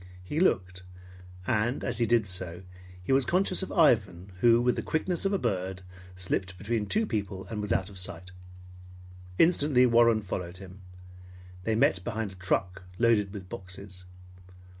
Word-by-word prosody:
He 145 - -3
looked; 90 - +1 0.6
and 120 +3 0
as - - -2
he 115 - +2
did 115 -3 +2
so, 90 -1 -4 0.4
he 90 - -3
was 135 0 +4
conscious 185 +5 +1
of 190 - -5
Ivan 100 - +2
who, 115 +3 +5
with 125 +1 +2
the - - -2
quickness 175 +4 -2
of 195 - +2
a 200 - +2
bird, 95 - -2 0.3
slipped 95 0 -2
between 105 +2 -2
two 220 +2 +1
people, 100 - -4
and 105 -2 -3
was 105 -2 -4
out 95 0 +1
of 100 -2 -6
sight. 90 -1 -6 1.1
Instantly 145 -6 +5
Warren 115 -2 +4
followed 90 -2 -5
him. 95 0 -12 0.8
They 110 - +1
met 95 -4 +2
behind 110 -2 -3
a - - -12
truck 90 0 -1 0.2
loaded 110 -4 +3
with 95 -3 -8
boxes. 95 0 -8
100 Hz, 160 wpm, -28 LUFS, 95-120 Hz, 1.1 s, who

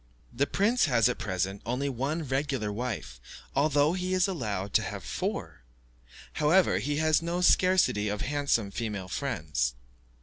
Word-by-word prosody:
The 140 +4 +1
prince 220 - +2
has 120 -6 +3
at 125 - -2
present 95 -2 -2
only 125 +5 -2
one 140 +5 -2
regular 135 -5 -1
wife, 105 - -5 0.3
although 145 +2 +3
he 185 0 -1
is 185 0 +3
allowed 105 - -3
to - - +4
have - - -6
four; - - -4 0.7
however, 155 - +3
he 145 +7 -2
has 155 0 +3
no 170 +2 -2
scarcity 180 - +3
of 105 0 -3
handsome 140 -8 0
female 100 -3 -4
friends. 75 - -2
135 Hz, 145 wpm, -28 LUFS, 105-155 Hz, 0.7 s, to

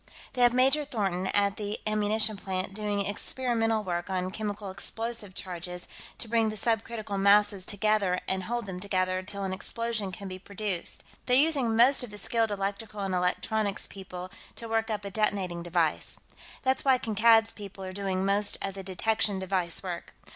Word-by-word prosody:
They 250 - -1
have 245 0 +7
Major 270 +4 +4
Thornton, 195 -9 -1
at 200 0 +2
the 210 0 -3
ammunition 215 +1 +2
plant, 190 -1 -3
doing 205 -1 -1
experimental 225 +1 0
work 175 -1 -2
on 185 -1 -1
chemical 205 -1 -4
explosive 220 +1 -4
charges 180 -1 -4 0.3
to - - -5
bring 225 -1 +2
the 215 - -5
subcritical 220 -1 -1
masses 200 -1 +4
together 205 -3 +2
and 190 -1 0
hold 240 +1 -2
them 185 -2 -5
together 185 -1 0
till 200 +1 -4
an 190 -1 -2
explosion 225 0 -2
can 195 +2 -7
be 185 0 -6
produced; 200 -2 -4 0.2
they're 250 - +5
using 275 -6 +3
most 250 +4 +6
of 245 - -6
the 210 - -9
skilled 225 +1 +1
electrical 205 +1 -3
and 195 -1 -1
electronics 200 +3 0
people 185 -2 -8 0.2
to 230 - -6
work 225 0 0
up 210 -2 -2
a 200 - -4
detonating 190 -5 0
device. 170 -2 0 0.4
That's 260 0 +2
why 265 -2 +5
Kankad's 225 0 +4
people 200 -2 -9
are 185 0 -5
doing 190 -1 -1
most 200 +1 +2
of 195 - -2
the 195 - -6
detection 200 +2 +1
device 185 -2 -1
work. 175 -2 -6
205 Hz, 175 wpm, -29 LUFS, 190-225 Hz, 0.4 s, have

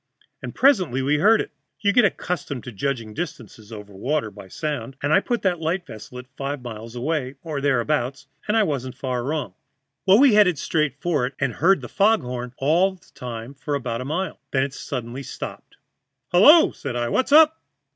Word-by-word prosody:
And - - -7
presently 185 - +3
we 145 +2 +2
heard 215 +6 +5
it. - - -7 0.3
You 200 -1 +2
get 245 -2 +5
accustomed 170 - -3
to 125 - -7
judging 115 0 -3
distances 115 - -7
over 105 -2 -9
water 125 +3 -2
by 100 -1 -12
the - - -17
sound, 145 - -4
and 145 +2 +2
I - - +6
put 240 +4 -2
that 180 -3 +1
light 165 +3 -1
ship 110 -4 -10
at 125 0 -7
five 140 -1 -4
miles 115 0 -8
away, 135 +1 -2
or 155 -4 -4
thereabouts, 135 0 0 0.2
and 210 +2 +2
I 220 - +5
wasn't 130 -8 -3
far 125 -2 -2
wrong. 150 +3 -3 0.5
Well, 190 +2 +7
we 270 -1 +6
headed 200 -6 +5
straight 150 -2 0
for 150 -7 0
it, 135 - -10
and 140 -4 -1
heard 190 +5 +3
the - - -7
fog 215 +2 +2
horn 125 0 -6
all 175 +7 +2
the 180 - -24
time 120 +1 -7
for 145 +1 -4
about 120 -3 -3
a - - -5
mile. 175 +7 -3
Then 135 -1 +1
it 135 0 -4
suddenly 125 -1 -5
stopped. 135 - -8 0.6
"'Hullo!' 300 - +7
said 120 - -6
I. 120 -1 -1
'What's 260 - 0
up?' 315 +1 +6
140 Hz, 200 wpm, -23 LUFS, 125-180 Hz, 0.6 s, Well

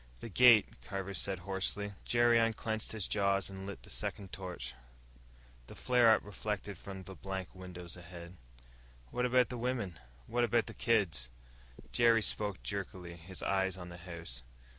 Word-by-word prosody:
"The 115 - -7
gate," 115 0 +6
Carver 100 -1 -4
said 95 0 +2
hoarsely. 100 +1 0
Jerry 120 -1 +5
unclenched 110 -1 0
his 110 -5 -2
jaws 100 -1 +2
and 95 0 -7
lit 100 - -7
the - - -10
second 95 -2 -3
torch. 90 -8 -5 0.9
The - - -10
flare 125 -2 +5
up - - -4
reflected 105 -1 -4
from 95 -1 -7
the 95 - -9
blank 95 -1 -5
windows 90 -2 -8
ahead. 85 0 -10 0.8
"What 125 +1 +1
about 125 0 +4
the 125 - -4
wimmen? 115 -9 -2 0.3
What 120 +1 +1
about 120 -1 +3
the - - -7
kids?" 95 - +1 0.6
Jerry 115 -2 +5
spoke 105 -2 -1
jerkily, 95 -3 -4
his 85 +2 -7
eyes 95 -1 +1
on 90 -1 -7
the 85 - -9
house. 85 -8 -7
100 Hz, 160 wpm, -34 LUFS, 90-115 Hz, 0.9 s, gate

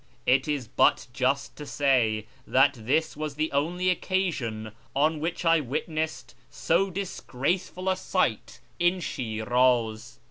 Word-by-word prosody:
It 130 +3 +3
is 145 -6 -2
but - - +3
just 135 +2 0
to 150 - -7
say 120 -7 +2 0.2
that 135 +2 +4
this 140 +7 0
was 150 -1 -4
the 155 +2 -1
only 175 +6 +1
occasion 145 - -2 0.2
on 155 +3 +2
which 165 +3 -3
I 165 0 +5
witnessed 155 +3 -3 0.2
so 185 +4 +1
disgraceful 180 -1 -3
a 190 - +3
sight 185 - -1 0.2
in 175 +2 +3
Shiraz. 120 -3 0
145 Hz, 130 wpm, -27 LUFS, 125-170 Hz, 0.2 s, I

